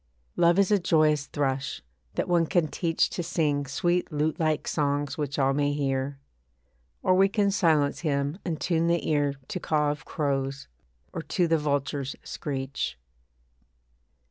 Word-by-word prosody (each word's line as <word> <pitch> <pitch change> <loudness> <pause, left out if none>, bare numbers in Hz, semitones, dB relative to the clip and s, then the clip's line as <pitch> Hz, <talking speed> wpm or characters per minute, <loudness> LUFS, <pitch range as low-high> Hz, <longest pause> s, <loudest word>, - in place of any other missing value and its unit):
Love 170 +1 +4
is 200 0 +3
a 205 - +5
joyous 155 -4 +2
thrush, 135 - -2 0.3
that - - -1
one 170 -2 +3
can 175 -3 +2
teach 165 +1 +1
To - - -3
sing 150 -4 0
sweet 175 +5 0
lute 155 +3 -1
like 155 -2 0
songs 145 -1 0
which 145 -2 -3
all 135 -1 +3
may 145 0 +1
hear. 135 -1 -1 0.9
Or 185 - +4
we 195 +1 +5
can 200 0 +2
silence 160 -7 +2
him 145 +1 -1
and 165 -4 -3
tune 165 -1 +1
the 170 0 +1
ear 145 -2 +1
To 185 - -3
caw 150 -3 +1
of 145 -2 -6
crows, 135 -2 -2 0.5
or - - -3
to 170 +3 0
the 165 -1 +2
vulture's 140 -2 -1
screech. 135 - -4
150 Hz, 155 wpm, -27 LUFS, 140-170 Hz, 0.9 s, a